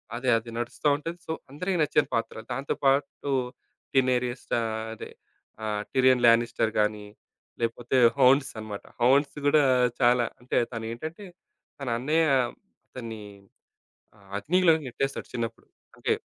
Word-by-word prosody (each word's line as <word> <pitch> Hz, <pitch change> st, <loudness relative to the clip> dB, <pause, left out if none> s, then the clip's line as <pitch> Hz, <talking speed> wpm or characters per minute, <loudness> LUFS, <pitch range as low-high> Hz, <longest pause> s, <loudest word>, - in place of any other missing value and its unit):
అదే 125 Hz, +2 st, -1 dB
అదే 115 Hz, +1 st, -7 dB
నడుస్తా 120 Hz, +5 st, -2 dB
ఉంటది. 165 Hz, +4 st, -6 dB
సో -, -, -2 dB, 0.2 s
అందరికీ 180 Hz, +6 st, -2 dB
నచ్చిన 150 Hz, -, +2 dB
పాత్ర. 115 Hz, 0 st, -2 dB, 0.2 s
దాంతో 135 Hz, +3 st, -2 dB
పాటు 140 Hz, +1 st, +1 dB, 0.6 s
'టినేరియస్తా' 125 Hz, -2 st, +1 dB, 0.3 s
అదే. 110 Hz, -, -9 dB, 0.5 s
ఆ! -, -, -2 dB, 0.3 s
'టిరియన్ 130 Hz, -2 st, +4 dB
లానిస్టర్' 115 Hz, -1 st, +3 dB
గానీ, 105 Hz, 0 st, 0 dB, 0.6 s
లేకపోతే 120 Hz, +2 st, -1 dB, 0.2 s
'హౌన్స్' 135 Hz, +1 st, +5 dB
అనమాట. 105 Hz, -2 st, -7 dB, 0.2 s
'హౌన్స్' 140 Hz, +4 st, +3 dB
గూడా 150 Hz, +1 st, +5 dB, 0.4 s
చాలా 120 Hz, -1 st, +4 dB, 0.2 s
అంటే 125 Hz, -, -2 dB, 0.2 s
తనేంటంటే 120 Hz, -, -6 dB, 0.5 s
తన 140 Hz, -, -6 dB
అన్నయ్య 155 Hz, +5 st, +2 dB, 0.6 s
అతన్ని 115 Hz, -4 st, -7 dB, 0.9 s
ఆహ్, 100 Hz, -2 st, -21 dB
అగ్నిలోకి 165 Hz, -, +3 dB
నెట్టేస్తాడు 135 Hz, +3 st, -3 dB
చిన్నప్పుడు. 115 Hz, -1 st, -4 dB, 0.3 s
అంటే -, -, 0 dB
125 Hz, 120 wpm, -27 LUFS, 115-145 Hz, 0.9 s, హౌన్స్